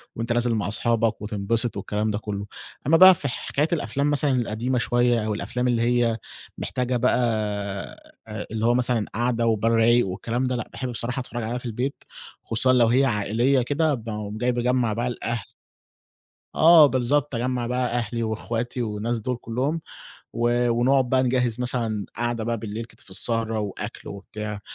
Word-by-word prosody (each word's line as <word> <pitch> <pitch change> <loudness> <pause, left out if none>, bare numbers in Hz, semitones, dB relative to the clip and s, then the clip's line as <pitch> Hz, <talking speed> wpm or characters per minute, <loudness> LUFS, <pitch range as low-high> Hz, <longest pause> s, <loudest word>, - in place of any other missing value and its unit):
وأنت 115 +1 -2
نازل 120 0 +1
مع 100 -3 -1
صحابك 115 +1 0
وتنبسط 110 +2 -1
والكلام 105 +2 -2
ده 105 - -1
كُلّه، 100 -1 -5 0.4
أمّا 165 +3 +5
بقى 185 +2 +10
في 155 -5 -2
حكاية 140 +3 -1
الأفلام 145 -2 0
مثلًا 145 -1 +1
القديمة 125 0 -1
شوية 120 -1 +2
أو 110 - -1
الأفلام 125 +4 -2
اللي 120 -2 +1
هي 120 -1 +2 0.4
محتاجة 125 0 -1
بقى 125 +2 +2 1.4
اللي 110 0 -1
هو 120 - +4
مثلًا 120 -3 +2
قعدة 120 0 0
وبال 115 0 +2
رايق 115 0 +4
والكلام 115 +7 -3
ده، 125 - -1
لأ 120 - -4
باحب 130 - -5
بصراحة 125 +2 -3
اتفرّج 120 -2 -5
عليها 115 +3 -2
في 125 - -9
البيت، 125 +5 -3 0.4
خصوصًا 130 +3 +2
لو 120 -2 +5
هي 130 +4 +4
عائلية 120 +3 +1
كده 145 +5 +1
باقوم 105 -3 -5
جاي 125 +2 +1
باجمّع 120 -1 +1
بقى 120 +3 -2
الأهل 115 -3 -3 1.1
آه 160 -1 +8
بالضبط، 135 +1 +1
اجمّع 125 0 -1
بقى 125 +1 0
أهلي 120 -1 -2
واخواتي 115 +2 -3
والناس 110 +1 -2
دول 125 +3 -3
كلهم، 130 +8 -2 0.5
و 120 +1 +1
ونقعد 125 +2 +2
بقى 130 0 +3
نجهّز 125 -2 0
مثلًا 115 -5 -2
قعدة 120 -1 -2
بقى 115 +1 -1
بالليل 110 +1 -5
كده 115 +1 -17
في - - -14
السهرة 115 +3 +1
وأكل 105 -2 -6
وبتاع، 105 +1 -7
120 Hz, 165 wpm, -24 LUFS, 110-125 Hz, 1.4 s, بقى